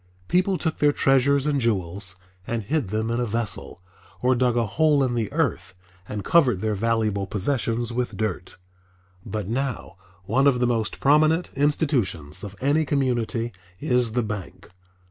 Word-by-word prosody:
People 185 Hz, +1 st, +2 dB
took 160 Hz, -2 st, -2 dB
their 145 Hz, 0 st, +4 dB
treasures 135 Hz, 0 st, +3 dB
and 145 Hz, -2 st, +1 dB
jewels 95 Hz, -4 st, -1 dB, 0.3 s
and 115 Hz, -2 st, -2 dB
hid 145 Hz, 0 st, -1 dB
them 110 Hz, +3 st, -2 dB
in 120 Hz, -, 0 dB
a 120 Hz, -, 0 dB
vessel, 110 Hz, -4 st, -4 dB, 0.4 s
or 125 Hz, +1 st, +3 dB
dug 125 Hz, -1 st, +1 dB
a 120 Hz, -, +2 dB
hole 145 Hz, +6 st, +2 dB
in 125 Hz, -2 st, 0 dB
the 115 Hz, -3 st, -2 dB
earth 95 Hz, -, -1 dB, 0.3 s
and 105 Hz, -1 st, -4 dB
covered 130 Hz, -, +4 dB
their 110 Hz, +2 st, -1 dB
valuable 105 Hz, -2 st, 0 dB
possessions 115 Hz, +2 st, -1 dB
with 125 Hz, 0 st, -2 dB
dirt. 95 Hz, -4 st, -3 dB, 0.7 s
But 105 Hz, -3 st, -4 dB
now 130 Hz, -3 st, -3 dB, 0.3 s
one 130 Hz, +9 st, +2 dB
of 130 Hz, -3 st, +3 dB
the 125 Hz, -, +2 dB
most 115 Hz, -3 st, -1 dB
prominent 155 Hz, +4 st, +3 dB
institutions 135 Hz, -, 0 dB
of 100 Hz, -1 st, -7 dB
any 145 Hz, +4 st, +2 dB
community 120 Hz, -5 st, -1 dB, 0.3 s
is 125 Hz, -3 st, +1 dB
the 120 Hz, 0 st, +1 dB
bank. 105 Hz, -5 st, -7 dB
120 Hz, 160 wpm, -24 LUFS, 105-140 Hz, 0.7 s, their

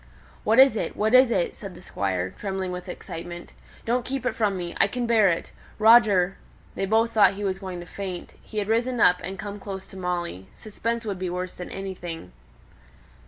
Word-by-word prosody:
"What 220 Hz, +2 st, +3 dB
is 265 Hz, -3 st, +8 dB
it? -, -, -3 dB
What 215 Hz, +2 st, +1 dB
is 255 Hz, -1 st, +7 dB
it?" 185 Hz, -7 st, 0 dB
said 195 Hz, -3 st, -9 dB
the -, -, -12 dB
Squire, 95 Hz, -, -2 dB
trembling 190 Hz, -, -4 dB
with 180 Hz, 0 st, -6 dB
excitement. 175 Hz, 0 st, -8 dB, 0.3 s
"Don't 240 Hz, +2 st, +1 dB
keep 265 Hz, +1 st, -3 dB
it -, -, +1 dB
from 205 Hz, -4 st, 0 dB
me. 175 Hz, -1 st, -4 dB
I -, -, +5 dB
can 245 Hz, +4 st, -3 dB
bear 225 Hz, -3 st, +4 dB
it. 170 Hz, -, -2 dB, 0.3 s
Roger 215 Hz, -5 st, +5 dB, 0.2 s
" -, -, -28 dB
They 195 Hz, -, -1 dB
both 225 Hz, +3 st, +3 dB
thought 210 Hz, -3 st, +5 dB
he 205 Hz, -, -5 dB
was 190 Hz, -1 st, -1 dB
going 185 Hz, -2 st, -6 dB
to -, -, -9 dB
faint; 185 Hz, -1 st, -6 dB
he 215 Hz, -, -10 dB
had 205 Hz, -1 st, 0 dB
risen 235 Hz, +3 st, +1 dB
up 180 Hz, -3 st, +5 dB
and 190 Hz, +1 st, -5 dB
come 205 Hz, 0 st, -6 dB
close 195 Hz, -1 st, -6 dB
to 190 Hz, -, -11 dB
Molly; 175 Hz, -, -3 dB
suspense 230 Hz, +2 st, -4 dB
would 200 Hz, -4 st, -3 dB
be 185 Hz, -1 st, -2 dB
worse 180 Hz, +1 st, -4 dB
than 180 Hz, -, -8 dB
anything. 175 Hz, -, -6 dB
195 Hz, 210 wpm, -25 LUFS, 180-220 Hz, 0.3 s, is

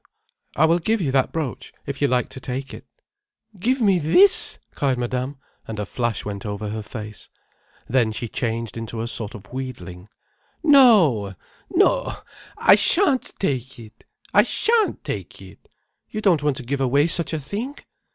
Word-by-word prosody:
"I 155 Hz, -, +4 dB
will 165 Hz, +2 st, +3 dB
give 220 Hz, +6 st, 0 dB
you 150 Hz, -8 st, -1 dB
that 135 Hz, -1 st, +1 dB
brooch 155 Hz, -6 st, -4 dB
if 140 Hz, 0 st, -6 dB
you 145 Hz, -, +4 dB
like 125 Hz, -2 st, 0 dB
to -, -, -9 dB
take 130 Hz, +1 st, -5 dB
it—" -, -, -11 dB, 0.7 s
"Give 250 Hz, +7 st, 0 dB
me 195 Hz, -4 st, +4 dB
this—!" 365 Hz, -, +5 dB, 0.2 s
cried 135 Hz, -3 st, 0 dB
Madame, 125 Hz, +3 st, -3 dB, 0.3 s
and 110 Hz, -, -6 dB
a 105 Hz, -, -3 dB
flash 120 Hz, +2 st, -2 dB
went 100 Hz, -1 st, -5 dB
over 105 Hz, 0 st, -4 dB
her 110 Hz, +1 st, -4 dB
face. 105 Hz, -1 st, -8 dB, 0.6 s
Then 120 Hz, -3 st, +2 dB
she 115 Hz, +2 st, -4 dB
changed 115 Hz, -1 st, -3 dB
into 115 Hz, 0 st, -5 dB
a 115 Hz, -, -3 dB
sort 115 Hz, -1 st, -2 dB
of 95 Hz, +1 st, -13 dB
wheedling. 105 Hz, -8 st, -7 dB, 0.5 s
"No—no. 175 Hz, -, +3 dB, 0.4 s
I -, -, +6 dB
shan't 265 Hz, -, +2 dB
take 130 Hz, -, -2 dB
it! 115 Hz, -1 st, -14 dB, 0.3 s
I -, -, +7 dB
shan't 455 Hz, -2 st, 0 dB
take -, -, -6 dB
it. -, -, -15 dB, 0.4 s
You 215 Hz, -, -4 dB
don't 185 Hz, -8 st, +3 dB
want 145 Hz, -2 st, 0 dB
to 130 Hz, -, -6 dB
give 135 Hz, +3 st, -3 dB
away 140 Hz, +3 st, +3 dB
such 170 Hz, 0 st, +1 dB
a 160 Hz, -, -2 dB
thing." 215 Hz, -, -5 dB
130 Hz, 165 wpm, -22 LUFS, 115-170 Hz, 0.7 s, I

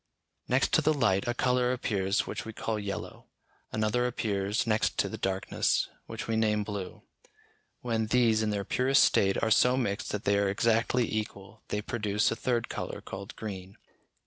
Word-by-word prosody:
Next -, -, +2 dB
to -, -, +5 dB
the 155 Hz, 0 st, +2 dB
light, 110 Hz, -8 st, +2 dB
a 120 Hz, -, 0 dB
colour 125 Hz, 0 st, +2 dB
appears 100 Hz, -4 st, 0 dB
which -, -, -5 dB
we 110 Hz, -, -7 dB
call 110 Hz, 0 st, -2 dB
yellow; 100 Hz, -1 st, -6 dB, 0.4 s
another 110 Hz, +3 st, +1 dB
appears 105 Hz, -3 st, -1 dB
next 110 Hz, -1 st, +1 dB
to -, -, +2 dB
the -, -, -5 dB
darkness, 95 Hz, 0 st, 0 dB, 0.2 s
which -, -, -6 dB
we 115 Hz, -, 0 dB
name 105 Hz, -1 st, +2 dB
blue. 100 Hz, -3 st, -6 dB, 0.8 s
When 115 Hz, -2 st, -1 dB
these, 115 Hz, -2 st, +3 dB
in 110 Hz, -, 0 dB
their 100 Hz, -1 st, -2 dB
purest 135 Hz, +2 st, +3 dB
state, 95 Hz, 0 st, +3 dB
are 110 Hz, -, +1 dB
so 125 Hz, +3 st, +5 dB
mixed 100 Hz, -6 st, -2 dB
that 105 Hz, -, -3 dB
they 100 Hz, 0 st, +2 dB
are 100 Hz, -1 st, +2 dB
exactly 115 Hz, +3 st, +2 dB
equal, 100 Hz, -2 st, -5 dB
they 105 Hz, 0 st, -2 dB
produce 105 Hz, -2 st, 0 dB
a -, -, -1 dB
third 120 Hz, -1 st, -1 dB
colour -, -, -5 dB
called 100 Hz, +1 st, -8 dB
green. 95 Hz, -3 st, -7 dB
110 Hz, 175 wpm, -29 LUFS, 100-120 Hz, 0.8 s, to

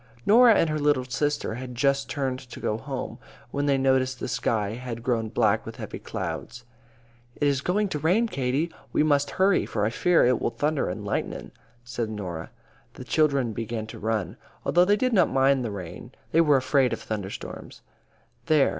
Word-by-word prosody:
Norah 230 Hz, +1 st, +7 dB
and 165 Hz, -, +3 dB
her 155 Hz, 0 st, -1 dB
little 145 Hz, -3 st, +2 dB
sister 145 Hz, -1 st, -1 dB
had 125 Hz, +1 st, -7 dB
just 140 Hz, +2 st, +1 dB
turned 135 Hz, -3 st, -2 dB
to 125 Hz, -2 st, -11 dB
go 105 Hz, -, -1 dB
home, 135 Hz, +3 st, -5 dB, 0.3 s
when 145 Hz, 0 st, -1 dB
they 140 Hz, -1 st, +3 dB
noticed 130 Hz, -1 st, +1 dB
the -, -, -3 dB
sky 110 Hz, -3 st, 0 dB
had 115 Hz, 0 st, -6 dB
grown 115 Hz, -3 st, 0 dB
black -, -, +2 dB
with -, -, -8 dB
heavy -, -, -7 dB
clouds. 120 Hz, +1 st, -6 dB, 0.7 s
"It 145 Hz, -, +1 dB
is 140 Hz, -2 st, +1 dB
going 205 Hz, +7 st, +1 dB
to 150 Hz, -, -3 dB
rain, 180 Hz, +10 st, +3 dB
Katie. 140 Hz, -, -1 dB, 0.2 s
We -, -, +2 dB
must 145 Hz, -2 st, +2 dB
hurry, 195 Hz, +1 st, +3 dB
for 105 Hz, -2 st, -1 dB
I 110 Hz, -, 0 dB
fear 175 Hz, +6 st, +3 dB
it 125 Hz, -1 st, +2 dB
will -, -, +1 dB
thunder 150 Hz, +4 st, -1 dB
and -, -, -5 dB
lighten," -, -, -3 dB, 0.3 s
said 120 Hz, -2 st, -3 dB
Norah. 90 Hz, -7 st, -5 dB, 0.5 s
The -, -, -8 dB
children 140 Hz, -7 st, +1 dB
began 115 Hz, 0 st, -4 dB
to 110 Hz, -, -10 dB
run. 110 Hz, 0 st, -2 dB, 0.3 s
Although 175 Hz, +1 st, +4 dB
they 205 Hz, +2 st, +3 dB
did 255 Hz, +2 st, 0 dB
not 185 Hz, -5 st, +4 dB
mind 135 Hz, 0 st, +3 dB
the 115 Hz, -, -2 dB
rain, 95 Hz, -5 st, -8 dB, 0.2 s
they 165 Hz, -, +5 dB
were 150 Hz, -3 st, +4 dB
both 130 Hz, -, +2 dB
afraid 130 Hz, -4 st, +2 dB
of -, -, -3 dB
thunder 105 Hz, -3 st, -4 dB
storms. -, -, -9 dB, 0.6 s
"There! 155 Hz, -3 st, +4 dB
130 Hz, 195 wpm, -26 LUFS, 115-150 Hz, 0.7 s, Norah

